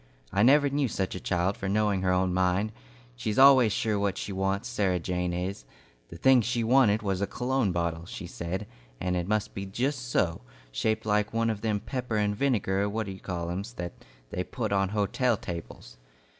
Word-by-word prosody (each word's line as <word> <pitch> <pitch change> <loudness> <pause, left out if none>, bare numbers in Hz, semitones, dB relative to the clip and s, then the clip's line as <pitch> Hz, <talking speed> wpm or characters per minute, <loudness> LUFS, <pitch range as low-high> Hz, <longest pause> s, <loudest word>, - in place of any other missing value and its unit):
I 100 - +2
never 145 +5 +6
knew 140 0 +1
such 95 -4 -2
a 90 - -5
child 90 +2 0
for 95 - -3
knowing 105 -1 +1
her 95 -1 +1
own 90 0 +1
mind. 95 +3 +1 0.4
She's 105 - -3
always 130 -4 +7
sure 105 0 0
what 100 -1 0
she 100 - -4
wants, 95 +1 -1
Sarah 95 -3 +1
Jane 90 0 -2
is. 90 -2 -3 0.5
The 85 - -9
thing 130 +6 +5
she 120 +1 -1
wanted 115 -3 +4
was 95 -2 -1
a 100 - +1
cologne 125 -4 0
bottle, 85 -1 -2
she 90 - -7
said, 90 +3 -4 0.3
and 90 0 -1
it 90 0 -2
must 105 0 0
be 100 0 -5
just 125 +5 -2
so, 85 - +1 0.3
shaped 110 - -1
like 105 0 +1
one 115 0 +1
of 105 -2 -5
them 110 -2 0
pepper 125 0 -3
and 105 -1 +1
vinegar 105 -6 +1
what 110 +1 -2
d' - - -6
you 95 - -9
call 85 -2 -4
em's, 100 +7 -5
that 90 -7 -5 0.4
they - - -2
put - - -4
on 95 -1 +2
hotel 110 +4 +1
tables. 85 -9 -8
100 Hz, 200 wpm, -28 LUFS, 90-115 Hz, 0.5 s, always